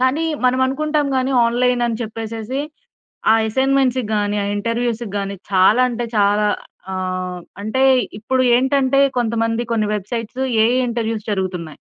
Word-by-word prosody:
కానీ 260 +5 +1 0.2
మనం 250 0 +3
అనుకుంటాం 300 +2 0
గానీ 260 +1 0
ఆన్‌లై‌న్ 245 +1 +1
అని 230 -2 -2
చెప్పేసేసి, 225 +3 -5 0.7
ఆ - - +8 0.2
ఎ‌సైన్‌మెం‌ట్స్‌కి 265 +1 +1
గానీ, 205 0 0
ఆ - - -2
ఇంటర్‌వ్యూ‌స్‌కి 230 0 -2
గానీ 200 0 -4 0.2
చాలా 195 +6 +5
అంటే 240 0 -3
చాలా 205 +1 +3 0.5
ఆహ్, 185 -1 -3 0.2
అంటే 220 +6 -2 0.4
ఇప్పుడు 255 +4 0
ఏంటంటే 265 +1 +2 0.2
కొంతమంది 230 0 0
కొన్ని 220 -2 +1
వెబ్‌సై‌ట్స్ 230 +4 -4 0.2
ఏఐ 240 +3 +2
ఇంటర్‌వ్యూ‌స్ 225 -2 -3
జరుగుతున్నాయి. 180 -6 -3
230 Hz, 130 wpm, -19 LUFS, 210-255 Hz, 0.7 s, ఆ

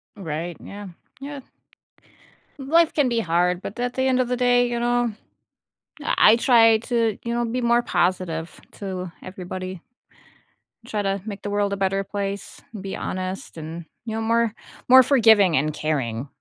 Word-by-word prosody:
Right, 170 -2 -5
yeah, 205 0 -8 0.3
yeah. 285 +1 -6 1.2
Life 320 +4 +3
can 290 -4 +2
be 235 -1 0
hard, 180 -1 +1
but 205 - -7
at 245 0 -1
the 260 - -2
end 260 -1 +2
of 255 - +1
the 250 - 0
day, 245 0 +3
you 240 0 -2
know, 240 -1 +1 0.9
I - - -1 0.2
I - - +6
try 230 -3 +5
to, 230 -2 0
you 235 - -2
know, 240 0 0
be 235 +2 -2
more 235 0 +3
positive 175 -5 -1
to 185 -3 -5
everybody. 185 -1 -7 1.0
Try 215 -3 -2
to 195 -1 -1
make 205 -2 -6
the 205 - -5
world 205 0 0
a - - -2
better 195 0 0
place, 200 0 -5 0.2
be 195 0 -5
honest, 185 -1 -5
and, 160 +1 -7 0.2
you 220 -1 -4
know, 225 - -2
more 230 0 +1 0.3
more 260 +1 +9
forgiving 220 - +5
and 150 +3 0
caring. 135 -6 -2
205 Hz, 165 wpm, -23 LUFS, 185-240 Hz, 1.2 s, more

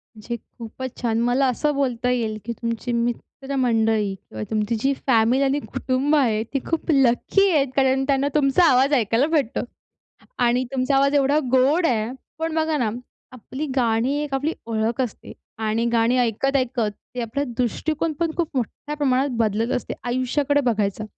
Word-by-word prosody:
म्हणजे 225 +2 -5
खूपच 240 +3 -9
छान. 230 -2 0
मला 245 +3 +2
असं 295 +4 0
बोलता 250 -3 0
येईल, 225 -3 -1
की 235 - -3
तुमची 230 +1 -4
मित्रमंडळी 235 -3 0
किंवा 110 - -9
तुमची 215 +1 0
जी 275 +3 +1
फॅमिली 245 +2 +3
आणि 275 +2 +1
कुटुंब 275 +2 -1
आहे, 225 -7 +2
ती 275 +4 -3
खूप 330 0 -1
लकी 275 +9 +3
आहेत, 280 -4 +3
कारण 265 -1 +3
त्यांना 275 0 +2
तुमचा 285 +4 +3
आवाज 265 +3 +3
ऐकायला 235 +2 +2
भेटतो 285 -6 0 0.9
आणि 245 +2 +2
तुमचा 265 +1 +1
आवाज 275 +1 +3
एवढा 285 +1 +3
गोड 275 +7 +3
आहे. 225 -3 +1 0.3
पण 325 0 -2
बघा 315 -1 +1
ना, 240 -6 +1 0.4
आपली 260 +4 -6
गाणी 240 +1 +1
एक 280 -2 -6
आपली 290 +4 0
ओळख 225 +2 -1
असते 245 -5 -5 0.4
आणि 225 +2 0
गाणी 235 +2 +2
ऐकत-ऐकत 245 -1 0 0.2
ते 245 - -2
आपला 235 +5 -2
दृष्टिकोन 310 +6 -1
पण, 335 -1 +1
खूप 335 -3 0
मोठ्या 290 +5 -4
प्रमाणात 275 -1 +1
बदलत 225 +1 0
असते - - -3
आयुष्याकडे 255 +4 +1
बघायचा. 210 -1 -1
255 Hz, 160 wpm, -23 LUFS, 230-280 Hz, 0.9 s, फॅमिली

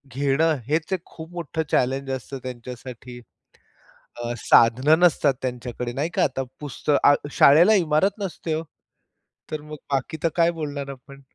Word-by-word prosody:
घेणं 145 +3 +2
हेच 155 +5 -1
एक 180 - -1
खूप 160 +1 -11
मोठं 160 -2 -3
चॅलेंज 135 +2 +1
असतं 130 +1 -5
त्यांच्यासाठी. 125 0 -8 1.0
अ, 120 0 -4
साधनं 130 +10 +5
नसतात 155 -6 +4
त्यांच्याकडे 125 -1 -4
नाही 150 +6 -2
का, - - +3
आता 135 -1 -1 0.2
पुस्त 150 +1 -5
अ, 145 - +7 0.2
शाळेला 170 +12 +6
इमारत 180 +3 +2
नसते 170 -4 -3
हो. 160 +1 -3 0.9
तर 155 - -3
मग 155 - -7 0.2
बाकी 135 +4 -1
तर 165 - +3
काय 170 -1 +3
बोलणार 145 -3 -4
आपण? 140 +1 -12
140 Hz, 150 wpm, -23 LUFS, 130-160 Hz, 1.0 s, अ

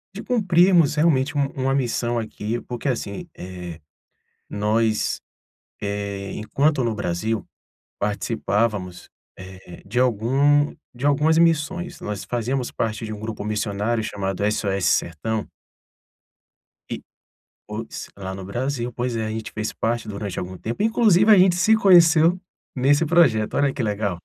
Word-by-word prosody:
de 210 - -5
cumprirmos, 180 - +4
realmente, 150 -3 +2
um 140 - +3
uma 135 0 0
missão 120 -2 0
aqui, 110 +1 -4
porque 125 +3 -6
assim, 125 - -3
eh, 90 -2 -8 0.7
nós, 110 +1 0 0.6
eh, 100 -1 -4
enquanto 135 +6 +1
no 115 -1 0
Brasil, 105 +2 -2 0.5
participávamos, 105 -2 -1 0.3
eh, 95 -1 -12
de 120 +5 -1
algum 135 +5 +3 0.2
de 125 +4 -5
algumas 150 +3 +3
missões. 170 +2 +1
Nós 105 -2 -5
fazíamos 120 +2 -2
parte 110 0 -2
de 110 - -6
um 105 - -8
grupo 110 -1 -5
missionário 105 +1 -1
chamado 95 -2 -3
SOS 100 -3 -1
Sertão 105 +7 0 1.4
e - - -4 0.7
pois, 110 +2 -6
lá 95 -1 -6
no 95 -1 -7
Brasil, 125 +3 -3
pois 120 0 -2
é. 115 - -1
E 110 - -2
a - - -3
gente 110 0 -5
fez 110 0 -3
parte 115 0 -2
durante 100 -2 -5
algum 90 +1 -5
tempo 115 - -3
inclusive 220 -3 +4
a 200 - +7
gente 180 -1 +5
se 215 +5 +4
conheceu 175 -3 +5 0.4
nesse 145 +5 +3
projeto, 135 -11 +3
olha 140 -1 +2
que 130 - -3
legal. 105 -4 -1
115 Hz, 140 wpm, -23 LUFS, 105-145 Hz, 1.4 s, a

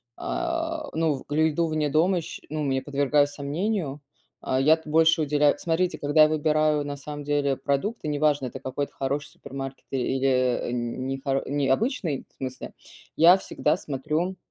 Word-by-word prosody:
а, 330 -2 -2
ну, 160 -4 0
в 145 - -5
еду 160 +2 +2
вне 155 -2 0
дома 170 +5 +2
сч - - -8
ну, 155 +1 -3
мне 135 -2 0
подвергаю 145 0 +2
сомнению, 145 +2 -3 0.4
а, 130 - 0
я-то 160 +3 +3
больше 160 0 +4
уделяю 145 0 +3
Смотрите, 175 +2 0
когда 145 +2 +3
я 155 - +5
выбираю, 155 -1 +2
на 145 0 -5
самом, 145 +1 -7
деле 145 -2 0
продукты, 155 +7 -2
неважно, 145 -2 +1
это 130 +1 -6
какой-то 135 +2 -4
хороший 140 +2 -2
супермаркет 135 0 -8
и 135 - -2
или, 130 +1 0
э, 125 -2 +1
н 120 +1 -3
не 135 0 -3
хор 135 0 0
не 140 -1 0
обычный 165 - 0
в - - -35
смысле, 130 -1 -6 0.4
я 175 +4 +7
всегда 155 -4 0
смотрю, 155 +4 -2
145 Hz, 170 wpm, -25 LUFS, 135-160 Hz, 0.4 s, я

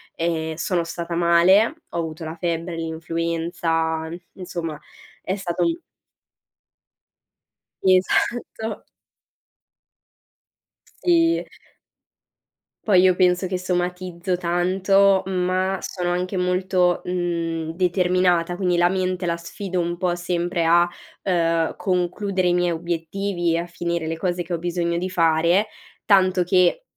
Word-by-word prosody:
ehm, 160 -1 -1
sono 170 +2 -1
stata 170 0 -5
male, 180 - +4
ho - - -5
avuto 160 -1 -4
la 160 +1 -5
febbre, 170 0 -3
l'influenza 165 0 -2 0.3
insomma 170 -4 -5 0.4
è 190 - -2
stato 190 -4 -2 2.2
Esatto. 210 +3 +1 2.2
Sì. 335 -1 +3 1.4
Poi 190 -4 +5
io 185 -1 +4
penso 180 0 +2
che 185 0 -2
somatizzo 180 0 -2
tanto, 190 +2 +3
ma 185 0 0
sono 175 -2 -3
anche 180 +2 -2
molto, 180 -1 +1
mhmm, 170 -2 -2
determinata, 180 0 +1
quindi 180 -2 0
la 175 0 +4
mente 185 -1 -1
la 170 -1 0
sfido 185 +2 -5
un 175 0 -2
po' 180 -1 0
sempre 175 0 -1
a, 170 +1 +5 0.4
ehm, 165 -3 +1
concludere 185 0 0
i - - +2
miei 175 0 +2
obiettivi 170 +1 -2
e - - +1
a 170 - -2
finire 170 -1 -3
le 160 +1 -3
cose 175 0 -1
che 175 +1 -6
ho 170 - -1
bisogno 170 0 -1
di 185 +1 -3
fare, 170 +2 +3 0.4
tanto 185 -3 +4
che 180 - +2
175 Hz, 115 wpm, -22 LUFS, 170-185 Hz, 2.2 s, Poi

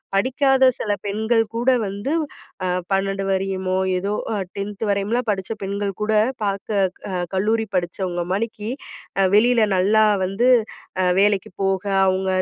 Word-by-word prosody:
படிக்காத 265 +4 +3
சில 210 - -1
பெண்கள் 220 +3 +1
கூட 240 +3 +1 0.2
வந்து 200 +7 -4 0.5
அ - - 0 0.2
12 195 0 0
வரையுமோ! 190 -1 -1 0.2
ஏதோ 200 +3 -2 0.2
அ - - -1 0.2
10ன்த் 200 +1 -4
வரையும்லாம் 215 +4 -1
படிச்ச 190 0 -4
பெண்கள்கூட 200 +2 -2 0.3
பார்க்க 200 +1 -1 0.3
அ - - -4 0.2
கல்லூரி 220 +4 +1
படிச்சவங்க 175 0 -2
மாரி 215 +1 -3 0.5
அ - - +4
வெளியில 230 +1 +5
நல்லா 215 +4 +4 0.2
வந்து 200 +7 +1 0.5
அ - - +2 0.2
வேலைக்கு 205 -2 +1
போக, 195 -1 0 0.2
அவுங்க 190 0 0
200 Hz, 130 wpm, -22 LUFS, 195-220 Hz, 0.5 s, வெளியில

